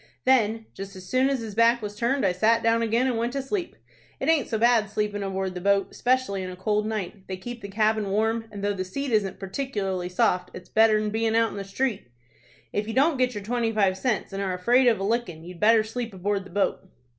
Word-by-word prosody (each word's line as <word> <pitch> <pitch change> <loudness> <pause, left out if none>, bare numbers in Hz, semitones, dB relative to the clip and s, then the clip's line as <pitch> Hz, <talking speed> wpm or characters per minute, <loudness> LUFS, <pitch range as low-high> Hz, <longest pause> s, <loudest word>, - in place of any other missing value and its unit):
Then, 225 -4 +3
just 195 0 -8
as 185 -1 -10
soon 255 +1 +2
as 270 -3 -1
his 220 -2 -6
back 230 +2 +4
was 205 0 -5
turned, 240 +4 0
I 190 - +3
sat 220 +6 +2
down 230 0 +3
again 230 +2 +1
and 245 -3 0
went 235 +2 -1
to 275 - -1
sleep. 355 +5 -3 0.4
It - - -1
aint 315 -5 +3
so 220 - 0
bad 230 -2 +3
sleepin' 205 0 -2
aboard 190 -1 -2
the 180 - -6
boat, 200 +1 +1
'specially 250 -6 0
in 185 - -5
a 180 - -7
cold 210 +3 0
night. 205 -3 -5
They 185 - -4
keep 240 +5 -8
the 200 - -6
cabin 215 0 +1
warm, 220 +3 0
and 200 -1 -7
though 205 0 +1
the 185 -2 -3
seat 275 +9 -4
isn't 200 -4 0
partic'larly 195 -4 -3
soft 180 0 +1
its 180 - -10
better'n 215 -1 +3
bein' 225 +1 0
out 230 0 +3
in - - -7
the 200 - -4
street. 205 - -2 0.7
If 210 +1 -1
you 225 - -4
don't 280 +3 +3
get 250 -2 +1
your 205 - -5
twenty 230 +1 0
five 200 -4 +2
cents, 215 -1 -2
and 195 - -3
are 190 -2 -1
afraid 245 +8 +3
of 225 -5 +3
a - - -3
lickin', 200 -7 -2
you'd 175 0 -10
better 220 +1 +5
sleep 225 -1 -5
aboard 195 +1 -2
the - - -12
boat." 200 +2 0
215 Hz, 240 wpm, -25 LUFS, 195-235 Hz, 0.7 s, better